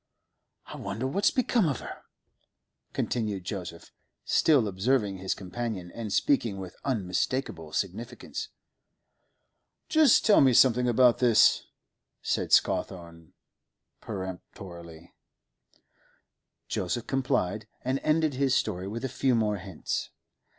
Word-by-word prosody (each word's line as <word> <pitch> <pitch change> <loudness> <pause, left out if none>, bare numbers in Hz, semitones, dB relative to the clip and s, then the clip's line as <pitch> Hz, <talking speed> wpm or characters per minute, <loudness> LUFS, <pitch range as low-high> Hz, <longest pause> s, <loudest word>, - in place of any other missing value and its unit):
'I - - -9
wonder 100 +5 -4
what's 200 +10 +2
become 235 -7 +1
of 135 - -2
her?' - - -9 0.9
continued 105 -6 -2
Joseph, 90 -3 -7 0.3
still 140 -9 +3
observing 100 0 0
his 95 0 -2
companion, 95 -2 -5
and 115 -3 -6
speaking 115 - +1
with 95 -2 -8
unmistakable 100 - -2
significance. 105 +8 -4 1.4
'Just 310 -6 +5
tell 215 - +6
me 130 -2 +5
something 125 0 +5
about 120 0 +4
this,' 120 -3 +4 0.6
said - - -1
Scawthorne 85 -3 0 0.7
peremptorily. 90 -4 -8 1.5
Joseph 115 +6 -2
complied, 110 -6 -1 0.2
and 130 +2 0
ended 155 0 +1
his 135 0 +1
story 90 +1 -1
with 115 +5 -4
a - - 0
few 130 0 +1
more 105 -2 +1
hints. 95 -3 -4
110 Hz, 110 wpm, -28 LUFS, 95-130 Hz, 1.5 s, tell